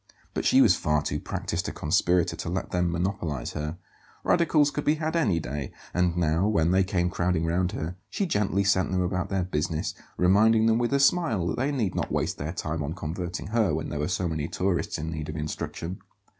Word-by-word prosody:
But - - -2
she - - +6
was - - +6
far 75 0 +1
too 75 - -2
practised - - -3
a - - -4
conspirator 90 0 +1
to - - -5
let 95 +2 -3
them 90 -1 +1
monopolize 85 -6 -2
her. 75 +2 -4 0.5
Radicals 150 -4 +3
could 145 - -3
be 150 - +3
had 160 +1 -2
any 120 - +2
day; 70 -1 -5 0.2
and 90 -1 +1
now, 85 +3 +2
when 85 -6 +2
they 95 +1 +4
came 90 -2 0
crowding 85 -2 0
round 90 +2 0
her, 80 +3 -4
she 200 - -1
gently 100 - +1
sent 95 -1 +2
them 95 -1 +1
about 90 +1 -1
their 95 -2 0
business, 80 -2 -2 0.2
reminding 110 +5 +5
them 115 0 +3
with 120 +1 0
a 140 - +3
smile 140 - +3
that 90 - -1
they 135 +4 0
need 115 -9 -1
not - - -2
waste - - -1
their 75 +3 -3
time 80 -2 -3
on 75 +3 -3
converting 85 +3 -4
her 105 -8 +2
when 80 - -3
there 75 - -3
were 75 - 0
so 90 -1 -1
many 80 -2 -2
tourists 90 0 -1
in 80 +2 -4
need 75 -1 -5
of 75 - -5
instruction. 80 +3 -4
90 Hz, 215 wpm, -27 LUFS, 80-100 Hz, 0.5 s, she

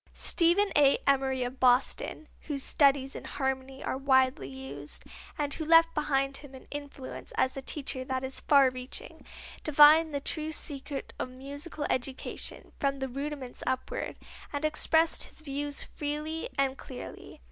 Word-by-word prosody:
Stephen 365 +4 +4
A. 280 -2 +6
Emory 265 -2 +2
of 250 +2 -5
Boston, 255 +4 +2 0.2
whose 280 -3 -2
studies 275 -3 +3
in - - -6
harmony 265 0 -3
are 260 - -2
widely 260 - +3
used, 135 +2 -5 0.3
and 290 -2 -1
who 320 - -3
left 330 +1 +6
behind 275 -2 0
him 280 -2 -12
an 260 - -12
influence 285 -2 -7
as 260 - +2
a 270 - -4
teacher 265 -1 -2
that 260 0 -2
is 265 0 -4
far 275 -3 +5
reaching, 255 0 -8 0.4
divined 305 +2 +7
the 285 - -1
true 310 +2 -2
secret 285 -2 -5
of - - -2
musical 285 +4 -6
education, 260 +1 -3
from 275 -1 +1
the 265 0 -3
rudiments 275 -1 -5
upward, 260 0 -2 0.4
and 290 +1 -2
expressed 320 +1 +2
his - - -7
views 290 -1 -2
freely 300 +2 -4
and 270 -1 +1
clearly. 255 - -9
275 Hz, 150 wpm, -29 LUFS, 260-295 Hz, 0.4 s, divined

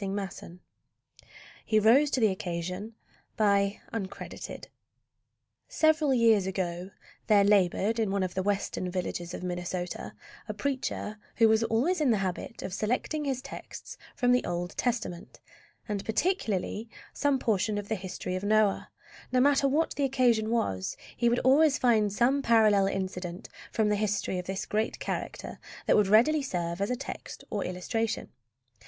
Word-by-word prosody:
HE 215 - +2
ROSE 250 +8 +5
TO 265 - 0
THE 220 -4 +4
OCCASION 180 +4 -4 2.7
Several 315 -3 +3
years 225 -5 +4
ago 185 -1 -3 0.4
there 205 -2 +5
labored 200 +2 +3
in 220 -3 +1
one 195 0 0
of 180 -1 -3
the 190 - -1
Western 195 -2 -1
villages 175 -1 -4
of - - -7
Minnesota 180 0 -4 0.3
a - - -3
preacher 260 -6 -3 0.2
who 225 - +5
was 220 +1 +3
always 285 +11 +1
in 290 - +3
the 225 - +3
habit 195 +6 -4
of 185 - -5
selecting 250 - -1
his 265 -2 -2
texts - - -9 0.2
from 245 -2 +2
the 250 - +3
Old 175 +2 -3
Testament, 225 -8 -3 0.5
and 205 -2 -3
particularly 220 - -1 0.2
some 285 -1 +1
portion 215 -3 0
of 205 -1 -4
the 220 - -1
history 185 -2 -4
of 185 - -4
Noah. 210 -1 +2 0.4
No 255 - +3
matter 275 +1 +4
what 305 +4 +1
the 285 - -2
occasion 245 -5 +2
was, 95 - -1 0.2
he 235 - +2
would 240 - +2
always 290 +3 +5
find 220 -4 +3
some 250 +7 +2
parallel 215 -5 +4
incident 185 -2 -4 0.2
from 220 -2 +1
the 210 - +2
history 205 -3 -1
of 180 - -7
this 190 0 -3
great 215 +2 -1
character - - -5 0.3
that - - +4
would 210 -2 +4
readily 245 +10 +5
serve 175 -8 -3
as 200 - 0
a 250 - 0
text - - -8
or 205 -3 -1
illustration. 225 +5 -3
215 Hz, 150 wpm, -29 LUFS, 190-245 Hz, 2.7 s, ROSE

